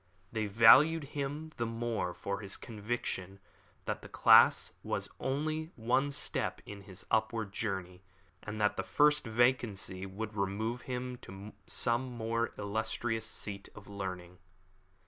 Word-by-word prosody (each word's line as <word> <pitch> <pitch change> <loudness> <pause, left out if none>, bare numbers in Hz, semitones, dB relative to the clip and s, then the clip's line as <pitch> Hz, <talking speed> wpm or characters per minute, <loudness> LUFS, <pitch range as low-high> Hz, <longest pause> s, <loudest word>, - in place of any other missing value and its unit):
They 110 -2 -1
valued 135 +10 +7
him 145 +2 -3
the 120 - 0
more 115 -5 -2
from 100 +1 -4
the 100 -1 -4
conviction 105 -4 -4 0.5
that - - -3
their - - -11
class - - +6
was - - -2
only 155 +4 -1
one 125 +5 +1
step 140 - -2
in 100 -1 -8
his 95 -2 -10
upward 110 -2 0
journey, 95 -4 -3 0.4
and 105 0 -6
that 105 -1 +2
the - - -1
first 150 -3 +3
vacancy 110 -5 +1
would 105 +3 -5
remove 105 +4 -2
him 125 0 -3
to 100 -1 -10
some 125 +2 +1
more 115 +1 -1
illustrious 110 +2 -2
seat 100 -2 -5
of 105 -2 -12
learning. 90 -3 -6
110 Hz, 135 wpm, -32 LUFS, 100-120 Hz, 0.5 s, valued